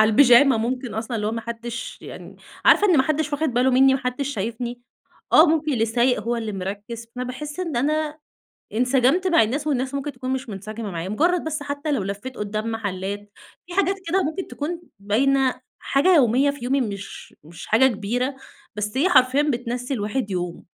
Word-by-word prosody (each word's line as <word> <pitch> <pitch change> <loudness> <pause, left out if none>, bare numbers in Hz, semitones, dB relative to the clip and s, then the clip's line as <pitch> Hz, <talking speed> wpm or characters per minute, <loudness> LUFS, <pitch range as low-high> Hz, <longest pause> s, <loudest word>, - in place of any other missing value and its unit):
على 215 - +6
البيجاما، 255 +2 +6
ممكن 250 +2 -3
أصلًا 225 +2 -3
اللي 210 -1 -2
هو 215 - -1
ما 230 - -3
حدّش 235 +1 -6
يعني - - -10 0.3
عارفة 415 - +6
إن 360 -5 +4
ما 265 - +5
حدّش 305 +1 -1
واخِد 310 +1 0
باله 250 +2 +2
منّي، 265 +1 +5
ما 265 - -1
حدّش 250 +2 -2
شايفني، 240 +1 -4 0.5
آه، 315 - +8
ممكن 310 -1 +1
اللي 225 -4 +2
سايق 240 +1 +2
هو 235 +3 -1
اللي 220 -2 -4
مركِّز، 205 +5 -6
فباحس 260 +6 -5
إن 330 -7 -3
أنا 305 +4 0 0.6
انسجمت 255 - +2
مع 335 -6 +5
الناس 280 +8 -2
والناس 265 -2 -1
ممكن 280 +1 -3
تكون 255 0 -6
مش 265 -1 -4
منسجمة 215 +1 -6
معايا، 170 +1 -4
مُجرّد 340 - +1
بس 305 -2 -3
حتى 285 +1 -3
لو 270 -9 0
لفّيت 205 +7 -6
قُدّام 215 +2 -3
محلّات، 205 -1 -4 0.3
في 350 - -10
حاجات 390 +1 +2
كده 375 +3 +2
ممكن 320 +5 -3
تكون 330 +4 -5 0.2
باينة، 255 +5 +1 0.2
حاجة 305 +7 +3
يومية 265 0 +4
في 280 -4 -8
يومي 270 +2 +1
مش 200 -4 -6
مش 165 +2 -11
حاجة 230 +5 +5
كبيرة، 245 +4 -2 0.4
بس 210 +3 -3
هي 330 +8 +3
حرفيًا 260 -2 +4
بتنسّي 250 -2 -2
الواحد 210 -1 -2
يومه، 175 -2 -4
250 Hz, 190 wpm, -23 LUFS, 220-285 Hz, 0.6 s, آه